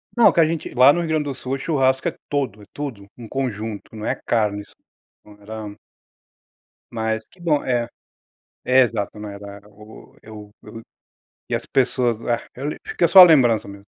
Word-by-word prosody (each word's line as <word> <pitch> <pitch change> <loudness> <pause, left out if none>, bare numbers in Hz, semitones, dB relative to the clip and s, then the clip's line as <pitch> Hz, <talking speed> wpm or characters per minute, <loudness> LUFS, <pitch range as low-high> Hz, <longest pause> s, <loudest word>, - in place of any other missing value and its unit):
Não, 240 -2 +6
que - - 0
a 165 - +6
gente, 160 -1 -4
lá 130 +3 +6
no 175 - -1
Rio 165 - -4
Grande 155 -1 +1
do 140 -2 -4
Sul, 130 0 -5
o 135 - -1
churrasco 130 -3 0
é - - -3
todo, 130 -8 -2
é - - -14
tudo, 130 -9 -6
um 120 -2 -10
conjunto, 110 -4 -5
não 110 - -7
é - - 0
carne, 105 -3 0
isso - - -17 0.5
não 105 0 -17
era 105 0 -8 1.2
Mas, 110 -1 -2
que 185 - -24
bom 155 -4 +1
é 120 -2 0 0.8
é 130 +1 +4
exato, 110 -4 -1
não 105 - -7
era 100 0 -10
o 105 +1 -16
Eu 105 -1 -12
eu 115 0 -11 0.7
e - - -2
as - - -3
pessoas 125 -3 0
ah, 120 -1 0 0.5
fica 170 - +1
só 185 +3 +9
a - - +13
lembrança 125 -10 +4
mesmo. 100 0 -12
120 Hz, 190 wpm, -21 LUFS, 105-135 Hz, 1.2 s, a